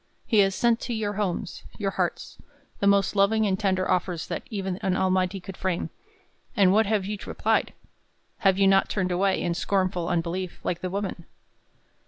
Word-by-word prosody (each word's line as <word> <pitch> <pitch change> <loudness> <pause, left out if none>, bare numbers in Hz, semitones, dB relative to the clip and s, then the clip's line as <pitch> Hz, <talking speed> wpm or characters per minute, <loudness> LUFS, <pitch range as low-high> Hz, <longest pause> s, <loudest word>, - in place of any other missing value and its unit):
He 220 - +3
has 195 -1 +4
sent 235 +3 +2
to 235 - -3
your 210 -2 -2
homes, 195 -4 -3 0.2
your 195 -2 -1
hearts, - - -3 0.4
the 200 - +2
most 200 0 +3
loving 215 +2 +3
and 190 -2 0
tender 185 -3 +1
offers 180 -2 0
that - - -3
even 195 -5 -3
an 190 -1 -1
Almighty 185 0 +1
could 190 +1 -9
frame; 185 -3 -2 0.7
and 190 -2 +5
what 220 0 +4
have 205 -2 +1
you 205 0 -4
replied? - - 0 0.7
Have 195 -3 +3
you 195 - +4
not 195 0 +4
turned 185 -3 -1
away, 190 +2 +1
in 175 - -1
scornful 185 -2 0
unbelief, 175 +2 -2
like 175 - -2
the 185 - -2
woman? 190 -3 -4
195 Hz, 180 wpm, -26 LUFS, 185-200 Hz, 0.7 s, and